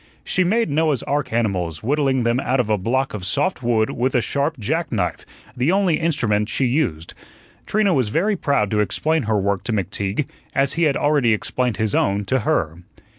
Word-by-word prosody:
She 185 - +1
made 215 -1 +1
Noah's 150 -3 +1
ark 145 0 -2
animals, 95 -9 -1
whittling 135 0 +1
them 120 +2 +1
out 135 0 0
of 115 -3 0
a 105 - +3
block 130 +7 -1
of 105 -3 -5
soft 130 - 0
wood 115 -3 +1
with 130 +2 -1
a - - +5
sharp 140 +5 -1
jack 155 +10 -2
knife, 90 -7 -2 0.3
the 130 +7 +1
only 190 -5 +2
instrument 115 -10 0
she 135 - +1
used. 120 - -1 0.5
Trina 210 -3 +2
was 125 -8 +1
very 200 - +1
proud 140 - 0
to 105 - +1
explain 155 - +1
her 110 - +2
work 100 -1 -1
to - - -2
McTeague 100 - -2 0.3
as 135 -1 +2
he 170 0 +1
had 145 -3 +2
already 145 -6 +2
explained 120 +1 -1
his 110 -2 0
own 100 +1 +1
to 130 +6 +1
her. 80 -7 -1
125 Hz, 195 wpm, -21 LUFS, 105-150 Hz, 0.5 s, a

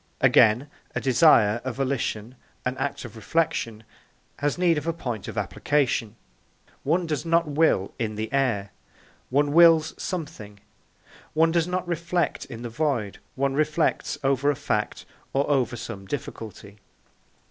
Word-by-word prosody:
Again, 115 +6 +5 0.3
a - - +1
desire, 120 -5 +4
a 130 - -2
volition, 125 -3 -2 0.3
an 125 +1 -1
act 135 -1 -3
of 115 - -10
reflection, 115 -2 -1 0.6
has 145 +2 0
need 170 -3 +3
of 150 - -9
a 165 - +1
point 120 - -5
of - - -7
application. 125 -7 0 0.7
One 170 +5 +1
does 155 -4 -2
not 165 0 +2
will 145 -10 +2
in 110 -2 -2
the 110 +5 -4
air, 115 -8 0 0.6
one 145 +2 +2
wills 165 -1 +6
something; 110 - -6 0.8
one 165 +1 +4
does 170 0 +1
not 180 0 -2
reflect 170 +1 -1
in 115 0 -9
the - - -3
void, 120 -6 -1 0.2
one 135 0 0
reflects 155 +2 0
over 135 +1 +2
a 145 - +2
fact - - -2 0.3
or 140 +1 +1
over 130 -4 +1
some 100 -4 -7
difficulty. 110 -6 -7
140 Hz, 145 wpm, -25 LUFS, 115-160 Hz, 0.8 s, wills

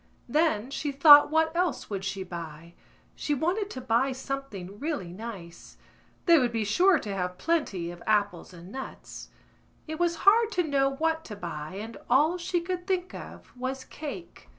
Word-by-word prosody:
Then 270 -4 +1
she 290 +1 -2
thought 290 +1 +8
what 320 +1 +2
else 355 -2 0
would 195 -1 -3
she 195 0 -3
buy: 170 -2 -8 0.4
she 295 - -1
wanted 370 +8 -1
to 260 - -7
buy 250 +2 +1
something 255 -8 -6
really 280 - -3
nice. 190 -5 -9 0.5
They 340 -3 +7
would 245 -3 +1
be 225 -2 -1
sure 355 - +4
to 205 -7 -5
have 180 -1 -3
plenty 205 - -1
of 175 0 -11
apples 205 -5 +1
and 175 +1 -12
nuts. 265 +2 -8 0.6
It 315 +1 -5
was 345 -1 +2
hard 445 +3 +6
to 360 - +2
know 275 -3 +2
what 320 +3 -1
to 210 - -7
buy 170 -3 -6
and 220 +3 -7
all 305 +8 +3
she 350 0 -1
could 360 +1 -4
think 370 -1 -1
of - - -10
was 260 +1 -4
cake. 310 +5 -9
265 Hz, 175 wpm, -28 LUFS, 195-325 Hz, 0.6 s, thought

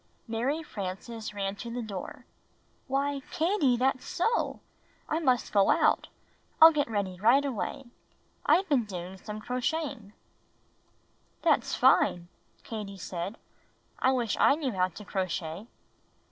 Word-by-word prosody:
Mary 255 +8 -1
Frances 215 -1 -6
ran 200 -1 -3
to 235 - -6
the 240 +1 -4
door. 200 -4 -7 0.6
"Why, 275 +1 0
Katie, 315 -7 +2
that's 260 +1 +1
so! 455 +7 0 0.5
I 315 - 0
must 255 -6 +1
go 200 -2 +4
out. - - +3 0.5
I'll 320 +1 +11
get 290 -5 0
ready 195 -4 -2
right 245 +7 +5
away. 270 +1 -3 0.6
I've 385 +2 +3
been 265 -8 +2
doing 185 -1 -7
some 210 +1 -7
crocheting." 250 -2 -3 1.3
"That's - - +2
fine," 175 0 +3 0.3
Katie 210 -3 -6
said. 185 +3 -5 0.6
"I 260 - +3
wish 240 -5 0
I - - +6
knew 290 -4 -2
how 185 -3 +1
to 185 +4 -11
crochet." 185 0 -3
230 Hz, 130 wpm, -29 LUFS, 195-275 Hz, 1.3 s, I'll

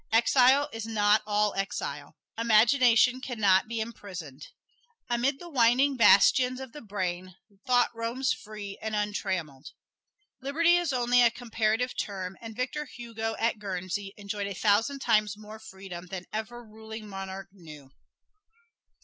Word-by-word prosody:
Exile 255 +5 +4
is 225 0 -5
not 210 -1 +3
all 210 0 +1
exile. 195 0 -4 0.2
Imagination 235 +2 +4
can 245 -3 -6
not 195 -2 +4
be 230 0 -4
imprisoned. 185 - -7 0.6
Amid 250 +4 +1
the 350 - -11
winding 265 -1 +3
bastions 250 +3 +5
of 265 -2 -8
the 295 - -10
brain, 185 -3 -4 0.3
thought 245 -1 +3
roams 235 +3 -1
free 210 -2 -9
and 220 0 -3
untrammeled. 185 -9 -3 0.7
Liberty 330 +6 +3
is 350 -3 -1
only 245 -1 +3
a 240 - +6
comparative 230 0 -1
term, 190 -2 -4
and 225 -1 -8
Victor 270 +5 -3
Hugo 225 -3 -5
at 225 -1 0
Guernsey 195 0 -4
enjoyed 200 0 -4
a 200 - -5
thousand 220 +9 +1
times 215 -4 +2
more 215 +1 -11
freedom 190 -4 -10
than 180 0 -7
ever 230 +3 -5
ruling 220 0 -10
monarch 195 -1 -7
knew. 155 -8 -14
220 Hz, 140 wpm, -28 LUFS, 195-245 Hz, 0.7 s, a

